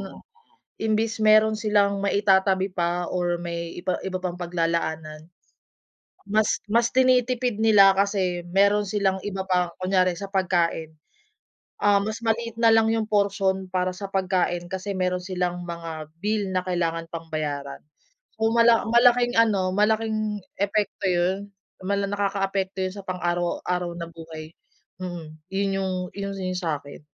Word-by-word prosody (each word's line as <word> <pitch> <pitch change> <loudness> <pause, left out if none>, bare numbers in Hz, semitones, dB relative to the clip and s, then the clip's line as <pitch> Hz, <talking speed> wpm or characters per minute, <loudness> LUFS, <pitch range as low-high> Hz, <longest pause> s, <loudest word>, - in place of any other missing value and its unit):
na - - -8 0.6
imbis 220 +1 0
meron 215 0 +4
silang 205 -2 +2
maitatabi 195 -1 +2
pa 175 0 -1
or 175 -1 -1
may 170 -1 -5
iba 180 +1 -2
iba 185 -1 -2
pang 180 -1 -3
paglalaanan, 165 -3 -2 1.0
mas 210 +2 +2 0.2
mas 235 +1 +4
tinitipid 250 -3 +2
nila 205 -3 +7
kasi 190 -3 0
meron 200 +2 +3
silang 195 -2 0
iba 195 -1 -4
pa, 180 -2 +1
kunyari 185 -1 +1
sa 200 +2 -7
pagkain, 170 -4 0 0.8
um, 200 -1 +3
mas 215 +2 -4
maliit 230 0 -1
na 230 - +5
lang 225 0 +4
yung 220 -1 -1
porsiyon 195 -2 0
para 185 0 -1
sa 200 - -7
pagkain 180 -2 0
kasi 190 +2 -4
meron 180 -1 -1
silang 180 -1 -2
mga 165 -2 -7
bill 205 -2 -1
na 185 - +1
kailangan 165 -2 -1
pang 165 0 -8
bayaran. 145 -2 -3 0.6
So 220 0 +1
mala 235 0 +5
malaking 240 +1 +4
ano, 195 -5 +2
malaking 215 0 0 0.2
epekto 200 -1 0
yun. 185 +3 0 0.3
Mala 200 +1 0
nakakaapekto 195 -1 -1
yun 185 - -3
sa - - -6
pang-araw-araw 175 0 -2
na 170 -1 -6
buhay, 160 -1 -10 0.5
mm, 175 -3 -6 0.2
yun 195 0 -1
yung 190 -1 -1 0.2
yun 200 0 -5
yung 185 -1 -3
sa'kin. 150 -5 -4
190 Hz, 140 wpm, -24 LUFS, 175-210 Hz, 1.0 s, nila